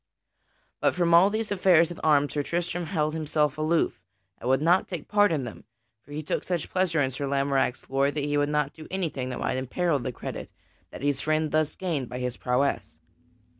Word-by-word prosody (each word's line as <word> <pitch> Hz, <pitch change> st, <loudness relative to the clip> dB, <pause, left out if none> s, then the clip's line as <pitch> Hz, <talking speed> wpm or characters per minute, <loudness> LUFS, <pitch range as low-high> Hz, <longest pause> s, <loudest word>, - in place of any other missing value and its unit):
But -, -, +2 dB
from 170 Hz, -1 st, +2 dB
all 175 Hz, +4 st, +7 dB
these 215 Hz, 0 st, -3 dB
affairs 180 Hz, -4 st, +4 dB
at 170 Hz, -, -8 dB
arms 145 Hz, -2 st, +3 dB
Sir 145 Hz, -, 0 dB
Tristram 175 Hz, +2 st, -2 dB
held 155 Hz, -3 st, 0 dB
himself 150 Hz, -2 st, 0 dB
aloof, 155 Hz, -, 0 dB, 0.4 s
and 125 Hz, -, -3 dB
would 130 Hz, 0 st, +4 dB
not 170 Hz, +5 st, +3 dB
take 175 Hz, -5 st, -6 dB
part 205 Hz, -2 st, +4 dB
in 150 Hz, -5 st, 0 dB
them. 120 Hz, -4 st, -8 dB, 0.4 s
For 145 Hz, -, -18 dB
he 150 Hz, +1 st, -4 dB
took -, -, -2 dB
such 175 Hz, -4 st, -3 dB
pleasure 185 Hz, -4 st, +1 dB
in 130 Hz, -, -1 dB
Sir 140 Hz, +2 st, -4 dB
Lamorack's 135 Hz, -2 st, 0 dB
glory 135 Hz, +1 st, +1 dB
that 145 Hz, 0 st, -3 dB
he 145 Hz, 0 st, -1 dB
would 145 Hz, 0 st, +2 dB
not 150 Hz, -1 st, 0 dB
do 155 Hz, -, -11 dB
anything 160 Hz, -9 st, -2 dB
that 125 Hz, -, -4 dB
might -, -, -1 dB
imperil 145 Hz, +4 st, 0 dB
the 130 Hz, +1 st, -3 dB
credit -, -, -7 dB, 0.4 s
that -, -, -9 dB
his 145 Hz, -1 st, 0 dB
friend 155 Hz, 0 st, 0 dB
thus 155 Hz, -1 st, +1 dB
gained 160 Hz, -9 st, -2 dB
by 125 Hz, -, -5 dB
his 125 Hz, -1 st, -3 dB
prowess. 130 Hz, +3 st, -1 dB
150 Hz, 205 wpm, -27 LUFS, 140-170 Hz, 0.4 s, all